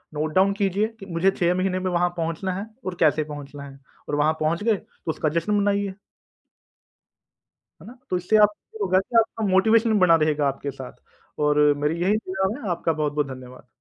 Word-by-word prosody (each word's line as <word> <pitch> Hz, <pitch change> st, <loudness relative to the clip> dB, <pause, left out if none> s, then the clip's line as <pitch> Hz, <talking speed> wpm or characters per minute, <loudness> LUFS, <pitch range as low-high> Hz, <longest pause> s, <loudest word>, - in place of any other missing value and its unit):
Note 155 Hz, +1 st, -2 dB
down 190 Hz, +1 st, +4 dB
कीजिए 200 Hz, +1 st, 0 dB
कि 195 Hz, -, -9 dB
मुझे 185 Hz, +1 st, +1 dB
6 175 Hz, -2 st, +1 dB
महीने 185 Hz, 0 st, 0 dB
में 185 Hz, -, -2 dB
वहाँ 175 Hz, 0 st, +2 dB
पहुँचना 165 Hz, +3 st, -2 dB
है 195 Hz, +3 st, -4 dB, 0.2 s
और 185 Hz, -1 st, -3 dB
कैसे 155 Hz, -1 st, +3 dB
पहुँचना 145 Hz, -1 st, -9 dB
है 135 Hz, 0 st, -15 dB, 0.3 s
और 145 Hz, -, 0 dB
वहाँ 150 Hz, +2 st, +2 dB
पहुँच 160 Hz, +5 st, 0 dB
गए 225 Hz, -1 st, +3 dB
तो 165 Hz, -, -12 dB
उसका 155 Hz, -, -1 dB
जश्न 170 Hz, +6 st, -2 dB
मनाइए। 200 Hz, -1 st, 0 dB, 1.9 s
है -, -, -13 dB
ना? 250 Hz, +2 st, -12 dB
तो 180 Hz, -, 0 dB
इससे 180 Hz, +5 st, +2 dB
आपको 210 Hz, 0 st, +1 dB
होगा 185 Hz, 0 st, +3 dB
कि 215 Hz, +5 st, -7 dB
आपका 225 Hz, 0 st, -1 dB
मोटिवेशन 220 Hz, +3 st, +3 dB
बना 180 Hz, -2 st, +6 dB
रहेगा 150 Hz, -2 st, +1 dB
आपके 140 Hz, +1 st, -3 dB
साथ 130 Hz, -1 st, -9 dB, 0.5 s
और 150 Hz, 0 st, +2 dB, 0.3 s
मेरी 160 Hz, +3 st, 0 dB
यही 200 Hz, +4 st, +2 dB
दुआ 190 Hz, -2 st, -2 dB
है। 205 Hz, -, -5 dB
आपका 165 Hz, -1 st, 0 dB
बहुत-बहुत 150 Hz, -1 st, -1 dB
धन्यवाद। 125 Hz, 0 st, -13 dB
180 Hz, 190 wpm, -24 LUFS, 155-195 Hz, 1.9 s, बना